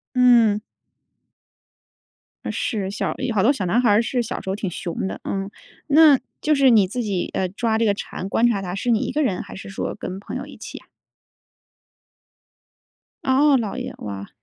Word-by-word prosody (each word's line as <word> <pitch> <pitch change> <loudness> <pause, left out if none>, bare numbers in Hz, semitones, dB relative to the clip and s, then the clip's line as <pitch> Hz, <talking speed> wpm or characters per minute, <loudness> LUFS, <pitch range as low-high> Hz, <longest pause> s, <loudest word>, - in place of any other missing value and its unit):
嗯。 235 -4 +5 1.9
是， 200 -4 -2
小 205 - -2
有 255 -3 -2
好 195 - +2
多 260 - +5
小 200 -10 -3
男 230 +8 +2
孩 235 - +3
儿 205 +2 +4
是 240 +1 -1
小 225 - -5
时 - - -9
候 190 - -1
挺 200 -3 -3
熊 175 +2 -4
的， - - -5
嗯。 195 0 -3 0.4
那 295 -2 +7 0.2
就 305 0 +2
是 275 -2 +5
你 215 -5 +5
自 245 +6 -3
己， 200 -5 -2
呃， 185 - 0
抓 220 +3 -1
这 230 - +2
个 205 - +3
蝉 195 -1 -6
观 230 - +2
察 210 -5 +1
它 180 -1 -4
是 240 +5 -1
你 225 -2 +3
一 - - -2
个 305 - 0
人 195 -9 0
还 - - -11
是 195 - -9
说 195 - -4
跟 190 +1 -6
朋 - - -7
友 - - -5
一 - - -12
起 - - -8
呀？ - - -24 2.4
哦， 275 +2 +4
姥 225 0 -3
爷， 255 0 -5
哇。 100 -1 -6
220 Hz, 210 characters per minute, -22 LUFS, 195-250 Hz, 2.4 s, 那